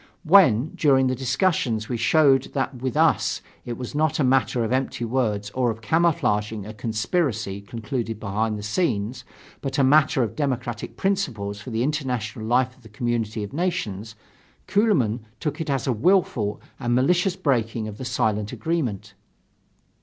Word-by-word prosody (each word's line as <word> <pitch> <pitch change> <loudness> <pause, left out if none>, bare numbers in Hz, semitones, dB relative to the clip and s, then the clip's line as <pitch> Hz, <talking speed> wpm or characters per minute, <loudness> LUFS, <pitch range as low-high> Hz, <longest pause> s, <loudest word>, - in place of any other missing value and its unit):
When 155 - +5
during 135 -3 +3
the 130 0 +1
discussions, 125 - 0
we 125 - -2
showed 135 +3 +3
that 135 -2 -2
with 130 -2 -2
us, - - +3 0.3
it 120 -2 -5
was 125 -2 -6
not 155 0 +1
a - - +3
matter 125 -2 +2
of 115 - -2
empty 130 -2 -1
words 110 -4 -1
or 125 0 +1
of 110 0 -4
camouflaging 110 - +1
a 110 - -7
conspiracy 110 - -1
concluded 115 +1 -4
behind 110 +1 -1
the 105 - -7
scenes, 115 - -1 0.4
but 135 -1 -3
a 140 - +4
matter 140 -1 +4
of 110 - -4
democratic 125 -6 -3
principles 115 - -1
for 130 - -8
the 115 0 -1
international 125 -6 -2
life 125 +2 +2
of 130 - -24
the 110 - -15
community 115 -1 -2
of 100 - -7
nations, 115 - -2 0.5
Kuehlmann 150 - +2 0.2
took 150 0 -3
it 160 - -4
as 135 -3 0
a 130 - +1
willful 120 - +1 0.2
and 120 -2 0
malicious 175 +8 +2
breaking 120 - 0
of 105 0 -8
the 130 - -5
silent 110 -4 0
agreement. 115 - -2
125 Hz, 160 wpm, -24 LUFS, 110-140 Hz, 0.5 s, When